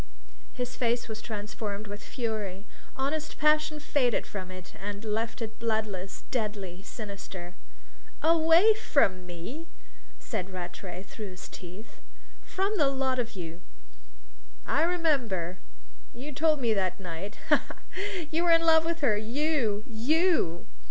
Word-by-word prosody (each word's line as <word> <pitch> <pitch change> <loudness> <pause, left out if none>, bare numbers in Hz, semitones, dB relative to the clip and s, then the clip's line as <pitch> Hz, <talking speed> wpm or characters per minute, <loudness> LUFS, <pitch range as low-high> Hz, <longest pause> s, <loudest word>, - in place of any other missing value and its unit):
His 250 -1 -3
face 235 -1 +1
was 220 -1 -5
transformed 210 -1 -4
with 205 0 -7
fury: 215 -5 -3 0.3
honest 295 +4 -1
passion 305 0 +3
faded 265 -5 +2
from 185 -3 -5
it 185 0 -9
and 205 +2 -4
left 225 +2 -1
it 220 -1 -6
bloodless, 215 -4 -1
deadly, 205 -6 -2
sinister. 195 -4 -7 0.7
"Away 330 +6 +7
from 195 - +2
me?" 180 - -6 0.5
said 195 -5 -3
Rattray, 180 0 -6
through 205 +1 -7
his 185 -1 -9
teeth. 185 +5 -10 0.4
"From 395 +3 0
the 290 - +6
lot 265 -1 +1
of 235 -1 -1
you." 170 -1 -6 1.0
"I - - +2
remember! 265 - +1 0.6
You 270 +5 -6
told 310 +1 +3
me 235 -4 +3
that 190 -3 0
night. 185 +2 -5
Ha, 300 - +8
ha, - - -8 0.2
ha! 390 -1 -3
You 330 +2 +2
were 345 - +5
in 330 0 +6
love 320 -1 +7
with 335 -1 -1
her 245 -7 +4
you 230 -1 +1
you!" 255 - +2
225 Hz, 140 wpm, -29 LUFS, 195-305 Hz, 1.0 s, Ha